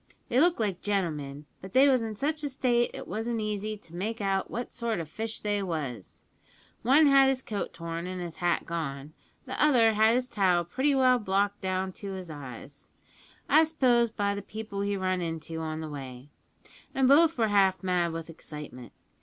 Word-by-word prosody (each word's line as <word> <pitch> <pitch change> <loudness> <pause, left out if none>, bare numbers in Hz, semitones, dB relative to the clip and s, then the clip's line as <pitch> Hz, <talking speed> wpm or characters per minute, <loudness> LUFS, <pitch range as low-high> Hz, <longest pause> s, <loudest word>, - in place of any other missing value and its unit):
They 245 - +3
looked 340 0 +4
like 200 -5 -1
gentlemen; 150 -8 -2 0.2
but 190 +1 -10
they 270 +2 +6
was 260 -3 +4
in 220 -1 -4
such 300 +7 -2
a 290 - -1
state 245 -3 +1
it - - -8
wasn't 225 +2 -2
easy 215 0 -3
to 170 -4 -15
make 220 +6 -3
out 195 -2 0
what 240 +1 -5
sort 230 -4 -2
o' 165 - -3
fish 220 +8 -4
they 205 -1 0
was. 150 - -5 0.6
One 275 +7 +5
had 275 -1 +6
his 265 -1 0
coat 205 -2 -4
torn 165 +1 -5
and 185 0 -5
his 175 -2 -6
hat 175 -1 0
gone; 150 -3 -5 0.3
the - - -1
other 240 -7 +5
had 220 +2 +4
his 250 0 0
tile 185 -7 +2
pretty 265 - +1
well 255 -2 +4
knocked 200 0 0
down 190 0 -1
on 195 -2 -6
his 185 -3 -7
eyes 140 0 -9 0.6
I 310 +3 +6
s'pose 255 -7 +3
by 205 -2 -1
the 200 - -4
people 215 -1 -6
he 200 0 -1
run 185 -1 -1
into 165 -1 -4
on 160 0 -4
the 155 - -5
way 135 -2 -8 0.7
an' 265 - +3
both 310 +4 +5
were 225 -2 +2
half 195 -2 +3
mad 180 -2 +1
with 165 0 -6
excitement. 150 -7 -10
200 Hz, 195 wpm, -28 LUFS, 165-235 Hz, 0.7 s, they